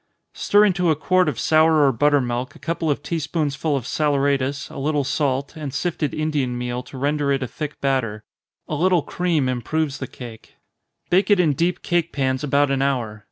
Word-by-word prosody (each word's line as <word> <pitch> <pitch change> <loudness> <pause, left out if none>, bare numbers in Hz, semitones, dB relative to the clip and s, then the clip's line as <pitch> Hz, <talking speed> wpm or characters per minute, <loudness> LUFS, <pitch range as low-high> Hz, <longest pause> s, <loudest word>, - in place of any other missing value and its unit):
_ - - -48 0.3
Stir 205 +1 +4
into 180 -3 +1
a 155 - +3
quart 185 +3 +2
of 135 - -5
sour 155 -1 +4
or 135 - +4
butter 145 +4 +3
milk 125 +1 -3
a - - -12
couple 165 -1 -2
of 145 - -1
tea 170 - -2
spoonsful 150 -1 -1
of 125 - -5
saleratus, 140 -1 0
a - - -9
little 145 +1 0
salt, 140 0 -1
and 150 -3 -5
sifted 160 -2 -2
Indian 145 -5 -1
meal 125 0 -3
to 130 - -11
render 145 +1 0
it 135 -1 0
a - - -3
thick 150 +5 -6
batter 120 -6 -1 0.4
a - - -5
little 175 +1 +2
cream 170 -7 0
improves 135 +4 -2
the 130 - -4
cake 115 -3 -11 0.6
bake 190 +4 +3
it 205 -2 +5
in 160 -5 +3
deep 175 +5 -1
cake 175 -1 0
pans 130 -1 -1
about 145 0 +2
an 135 -1 0
hour. 120 -6 -1
145 Hz, 205 wpm, -22 LUFS, 130-160 Hz, 0.6 s, it